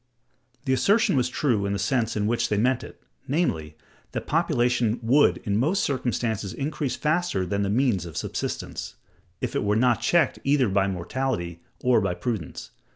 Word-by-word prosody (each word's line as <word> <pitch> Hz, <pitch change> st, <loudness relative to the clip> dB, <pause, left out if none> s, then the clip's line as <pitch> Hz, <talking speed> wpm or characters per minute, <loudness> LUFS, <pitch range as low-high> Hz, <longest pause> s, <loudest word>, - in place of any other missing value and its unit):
The 130 Hz, -, +2 dB
assertion 200 Hz, -, +3 dB
was 125 Hz, -2 st, +2 dB
true 115 Hz, -8 st, 0 dB
in 100 Hz, -, -1 dB
the -, -, -1 dB
sense 115 Hz, +3 st, 0 dB
in 105 Hz, -, 0 dB
which 120 Hz, +2 st, 0 dB
they 105 Hz, -, +1 dB
meant 125 Hz, +4 st, +2 dB
it, -, -, -12 dB, 0.2 s
namely, 80 Hz, -, -1 dB, 0.4 s
that -, -, -3 dB
population 120 Hz, -2 st, +1 dB
would 135 Hz, +6 st, +4 dB
in 100 Hz, -3 st, 0 dB
most 165 Hz, +11 st, +1 dB
circumstances 120 Hz, -6 st, -1 dB
increase 140 Hz, -1 st, -2 dB
faster 155 Hz, -, 0 dB
than 100 Hz, +3 st, -1 dB
the 100 Hz, -, 0 dB
means 110 Hz, -6 st, +1 dB
of 80 Hz, -, -8 dB
subsistence, -, -, -4 dB, 0.5 s
if -, -, -3 dB
it -, -, +1 dB
were 105 Hz, +1 st, +1 dB
not 120 Hz, 0 st, +3 dB
checked 155 Hz, +4 st, +2 dB
either 135 Hz, -4 st, +3 dB
by 95 Hz, 0 st, +2 dB
mortality 90 Hz, -2 st, -3 dB, 0.2 s
or 125 Hz, -1 st, +4 dB
by -, -, -1 dB
prudence. 110 Hz, -10 st, -4 dB
120 Hz, 170 wpm, -25 LUFS, 100-135 Hz, 0.5 s, would